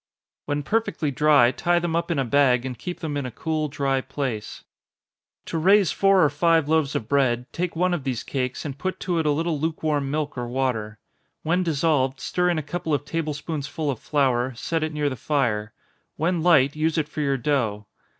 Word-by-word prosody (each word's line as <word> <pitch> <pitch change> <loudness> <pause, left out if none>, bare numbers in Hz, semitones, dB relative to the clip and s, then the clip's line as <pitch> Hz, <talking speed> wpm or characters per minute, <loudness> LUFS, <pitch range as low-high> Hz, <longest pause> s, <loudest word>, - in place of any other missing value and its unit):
When 145 0 -2
perfectly 195 -5 -1
dry, 140 -3 +5
tie 175 +6 +1
them 175 -1 -1
up 170 +1 -1
in 170 - 0
a 135 - +1
bag, 125 -1 +3
and 130 -1 -4
keep 175 +8 -7
them 155 -3 -3
in 140 -3 -2
a - - -5
cool 155 +5 -2
dry 135 -2 0
place. 130 -5 -5 0.8
To 165 - -3
raise 195 +1 +4
four 195 -2 +4
or 150 - +4
five 165 +1 +2
loaves 155 -2 +1
of 110 - -2
bread, 125 -3 +2
take 175 0 -2
one 180 +2 +1
of 165 -6 -2
these 130 -4 -2
cakes, 130 0 -3
and 140 -2 -6
put 185 +3 -3
to 175 -3 0
it 160 - 0
a - - +4
little 160 +1 -1
lukewarm 155 -3 -1
milk 145 -2 -2
or 120 - -3
water. 120 -4 -2 0.5
When 175 +4 +1
dissolved, 145 -5 +1
stir 180 0 0
in 175 - +1
a 155 - -2
couple 160 +1 -2
of 145 0 -4
table 155 -1 -2
spoonsful 150 0 -3
of 125 - -6
flour, 130 -3 +1
set 165 +7 -2
it 155 0 -1
near 150 -1 -1
the 135 - -2
fire 115 -5 -1 0.4
When 170 +2 0
light, 145 -5 +4
use 155 +1 0
it 155 -2 0
for 150 - -5
your 140 -2 +1
dough. 120 -7 -1
145 Hz, 210 wpm, -24 LUFS, 130-165 Hz, 0.8 s, dry